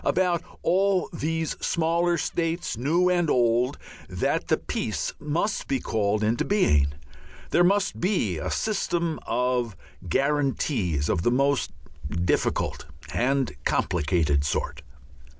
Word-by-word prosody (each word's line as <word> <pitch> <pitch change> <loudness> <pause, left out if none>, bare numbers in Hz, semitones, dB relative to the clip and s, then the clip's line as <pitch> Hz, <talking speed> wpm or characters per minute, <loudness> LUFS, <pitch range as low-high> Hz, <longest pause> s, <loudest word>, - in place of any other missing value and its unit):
About 175 -2 +2 0.2
all 190 +1 +2
these 160 0 -2
smaller 170 +1 +1
states, 165 -1 -2
new 160 +10 +2
and 175 -3 +2
old, 120 +2 +2 0.3
that - - -1
the - - +3
peace - - -3
must 160 +8 -1 0.2
call 105 -1 0
into 110 +2 +1
being, 75 - +2 0.6
there 175 - +4
must 195 +2 +2
be 170 - 0
a - - -3
system 170 -6 -1
of 125 -5 0 0.3
guarantees 135 - 0
of 85 - +1
the 110 - +2
most 140 +2 +2 0.4
difficult 85 -2 -1 0.3
and 135 +1 +1
complicated 80 -4 +1
sort. 70 - -2
140 Hz, 115 wpm, -26 LUFS, 105-170 Hz, 0.6 s, there